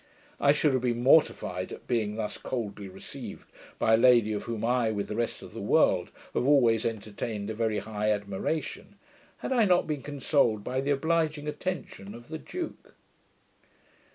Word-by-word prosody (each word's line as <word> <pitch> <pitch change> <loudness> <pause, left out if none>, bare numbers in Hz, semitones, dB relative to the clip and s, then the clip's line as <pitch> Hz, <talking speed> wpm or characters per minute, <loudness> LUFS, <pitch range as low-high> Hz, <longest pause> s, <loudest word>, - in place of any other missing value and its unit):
I 140 - +5
should 150 -1 +2
have 130 - +1
been 120 -1 -1
mortified 110 - +3
at - - -9
being 110 -4 0
thus 110 -1 -3
coldly 105 -5 -4
received 95 +1 -10 0.3
by 110 - +3
a - - +7
lady 120 -3 +5
of 105 - -4
whom 115 -1 -3
I, 120 -1 +2
with 105 -2 -3
the 105 - -3
rest 115 0 -2
of - - -11
the - - -6
world, - - +3 0.2
have - - +1
always 120 -7 +4
entertained 110 -1 -4
a - - -3
very 110 -1 0
high 105 0 -2
admiration, 105 +9 -2 0.5
had - - -2
I 235 -4 +4
not 180 -2 +3
been 150 -3 -3
consoled 135 -6 +1
by 130 +3 -1
the 140 - -3
obliging 155 +1 +1
attention 150 - -5
of 120 +3 -13
the 160 0 -5
duke. 350 - -7
120 Hz, 175 wpm, -28 LUFS, 105-145 Hz, 0.5 s, a